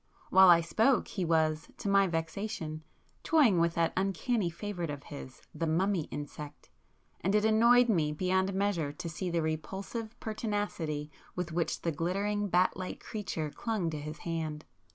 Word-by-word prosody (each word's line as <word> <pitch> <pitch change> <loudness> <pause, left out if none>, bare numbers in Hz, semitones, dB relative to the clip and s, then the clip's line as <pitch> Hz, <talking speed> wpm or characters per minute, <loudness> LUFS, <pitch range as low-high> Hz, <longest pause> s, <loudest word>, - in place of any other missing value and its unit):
While 190 0 +8
I 170 -1 +8
spoke 225 +9 +2
he 190 - -2
was, 160 -1 +1
to - - -5
my 200 0 +5
vexation, 165 -1 -3 0.4
toying 265 - +4
with 170 0 +2
that 165 -1 +1
uncanny 195 +2 0
favourite 175 -1 -4
of 145 -1 -5
his, 135 -3 -10
the 165 - -2
'mummy 175 +1 +1
insect,'—and 150 +6 -6
it 210 0 +3
annoyed 235 +3 +6
me 165 -9 +2
beyond 190 +4 +1
measure 190 -7 0
to 170 +3 -6
see 170 +3 -3
the 170 -1 0
repulsive 195 +8 -4
pertinacity 205 -9 -3 0.2
with 180 -2 -3
which 165 0 -1
the 165 - +1
glittering 200 +6 -1
bat 180 0 +3
like 185 -1 -5
creature 170 -8 -4
clung 210 -6 -2
to 155 - -4
his 155 +1 -6
hand. 160 -2 -4
175 Hz, 155 wpm, -31 LUFS, 160-205 Hz, 0.4 s, While